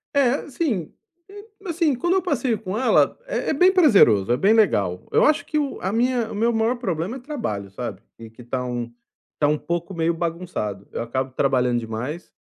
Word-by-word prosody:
É, 275 +1 +2
sim, 245 - -2 0.4
hum, 410 +1 -11 0.2
assim, 330 -4 +1
quando 345 +9 0
eu 380 - +2
passeio 270 - -1
com 195 0 -4
ela, 260 - +3
é - - -2
é - - +2
bem 360 +6 +5
prazeroso, 200 - +5
é 125 - +3
bem 200 +7 +4
legal, 100 - +1
eu - - +4
acho 305 0 +2
que 305 - -1
o 285 -2 -3
a 190 - -1
minha 235 0 0
o - - -6
meu 230 +3 +2
maior 225 +2 +1
problema 190 0 -3
é - - -10
trabalho, 235 - -4
sabe, 105 -2 -6 0.3
que 125 - -13
tá 125 +2 -3
um 120 -1 -4 0.5
tá 145 - +3
um 150 +1 +2
pouco 170 +4 -4
meio 165 -1 0
bagunçado, 165 - -4
eu - - -4
acabo 130 +3 -3
trabalhando 125 -3 +1
demais 120 +9 -6
185 Hz, 200 wpm, -23 LUFS, -, 0.5 s, bem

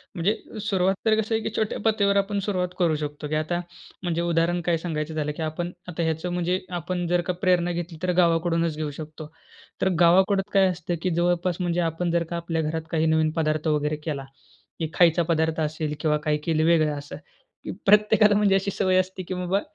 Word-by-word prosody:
म्हणजे 190 +6 +1 0.3
सुरुवात 195 -2 +1
तर 220 -1 +4
कसं 220 +1 -2
आहे? 220 - 0
की - - -1
छोट्या 215 -1 -1
पातळीवर 205 -2 +3
आपण 200 +1 0
सुरुवात 180 -3 0
करू 170 -3 +3
शकतो 150 0 -5
की 155 - -2
आता 155 +3 -1 0.4
म्हणजे 170 -1 -1
उदाहरण 170 +1 +1
काय 170 -1 +2
सांगायचं 160 -2 -4
झालं 150 -1 -2
की - - -5
आपण 165 +3 -3 0.2
आता 170 -1 -3
ह्याचं 160 +2 -2
म्हणजे 180 +1 0 0.2
आपण 175 +1 -3
जर 175 +1 +2
का - - +2
प्रेरणा 180 -2 +2
घेतली, 170 -1 -5
तर 180 - +2
गावाकडूनच 165 -1 +2
घेऊ 155 -1 -3
शकतो. 155 0 -8 0.5
तर 190 - +3
गावाकडं 190 +3 +5
काय 195 -1 +5
असतं 175 -1 -3
की 185 - 0
जवळपास 175 0 +1
म्हणजे 175 0 0
आपण 165 +1 -1
जर 170 0 +2
का - - -2
आपल्या 165 -1 -2
घरात 160 +1 -2
काही 160 -1 +1
नवीन 160 -1 +2
पदार्थ 155 0 0
वगैरे 150 0 0
केला 140 -4 -3 0.5
की 160 -2 -2
खायचा 170 -1 +4
पदार्थ 160 -1 0
असेल 155 0 -2
किंवा 150 -1 +1
काही 150 -1 +2
केलं 155 -2 +1
वेगळं 155 -3 +3
असं 145 0 -8 0.5
की - - -5
प्रत्येकाला 210 +1 +5
म्हणजे 205 -1 +3
अशी 195 +1 0
सवय 185 -1 +1
असते 185 0 -3
की 185 - -5
बाबा 180 +2 0
170 Hz, 205 wpm, -25 LUFS, 160-185 Hz, 0.5 s, गावाकडं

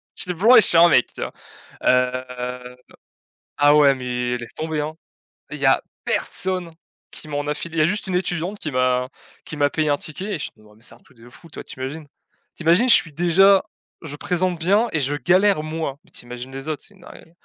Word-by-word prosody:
J'étais 180 -1 -1
blanc 220 +9 +5
et - - +9
je - - +2
suis 165 - +3
un 170 +1 +8
mec, 125 - +4
tu - - -9
vois! - - -5 0.5
Heu, 125 0 -1 0.8
ah 145 +1 +5
ouais, 140 -2 +5
mais 125 -1 -3
laisse 120 -1 -9
tomber, 155 -1 -3
hein! 155 +1 -5 0.6
Il 150 - -5
y 140 - -1
a 135 - +4 0.2
personne 180 -3 0 0.4
qui 155 - -11
m'en 145 0 -3
a 150 - 0
filé! 165 0 -7
Il - - +2
y - - +5
a - - +3
juste 205 +1 -3
une 185 - -2
étudiante 180 +2 -2
qui 155 - -5
m'a 125 0 +1 0.4
qui 150 - -7
m'a 145 0 +2
payé 155 -1 -1
un 145 - +2
ticket 160 +5 -7
et - - -6
ch - - -5
non 105 0 -20
mais 105 - -22
mais 115 - -23
c'est - - -13
un - - -22
truc 130 - -25
de 120 +2 -16
fou, 165 +7 -16
tu - - -14
vois. - - -6
Tu - - -12
imagines? 145 +3 -6 0.5
Tu 170 - -8
imagines, 180 +10 +4
je - - +9
suis 160 -3 0
déjà 190 +4 +4 0.4
je 145 -2 -7
présente 180 +1 -1
bien 205 +8 +2
et 155 - +1
je 140 +1 -1
galère, 185 +4 +2
moi! 155 -3 -4
Mais - - -26
tu - - -10
imagines 125 +2 -8
les 135 +3 -8
autres, 155 - -4
c'est 205 - -13
une 185 - -22
dinguerie, 165 - -15
150 Hz, 245 wpm, -21 LUFS, 130-175 Hz, 0.8 s, et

